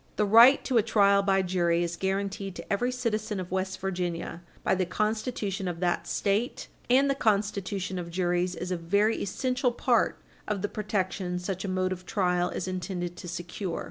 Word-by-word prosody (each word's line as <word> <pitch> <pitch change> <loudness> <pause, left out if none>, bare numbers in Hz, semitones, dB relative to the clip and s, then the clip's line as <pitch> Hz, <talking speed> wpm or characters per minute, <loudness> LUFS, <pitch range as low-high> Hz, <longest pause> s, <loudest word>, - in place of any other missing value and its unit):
The 210 - +2
right 230 +6 +7
to 250 -4 +3
a - - +5
trial 200 -1 +4
by 195 -1 +2
jury 175 -2 +1
is 170 0 -3
guaranteed 195 +1 -2
to - - -4
every 245 +5 +1
citizen 220 -4 -2
of 180 -1 -6
West 190 0 -2
Virginia 175 -3 -3 0.2
by - - +2
the 190 0 +1
Constitution 210 -1 -2
of 175 -2 -3
that 175 -1 0
State, 210 +4 -1 0.2
and 265 +3 +5
the 275 - +3
constitution 200 -5 0
of 170 -1 -6
juries 180 0 0
is 180 +2 -5
a 180 - 0
very 200 +6 +1
essential 250 +5 0
part 240 - +1 0.3
of 210 -2 -2
the 205 - 0
protection 190 -3 -2
such 185 +1 -4
a - - -3
mode 185 0 0
of 185 -1 -6
trial 180 -3 +1
is 185 - -4
intended 180 -1 -4
to - - -8
secure. 175 +1 -4
190 Hz, 185 wpm, -28 LUFS, 180-210 Hz, 0.3 s, right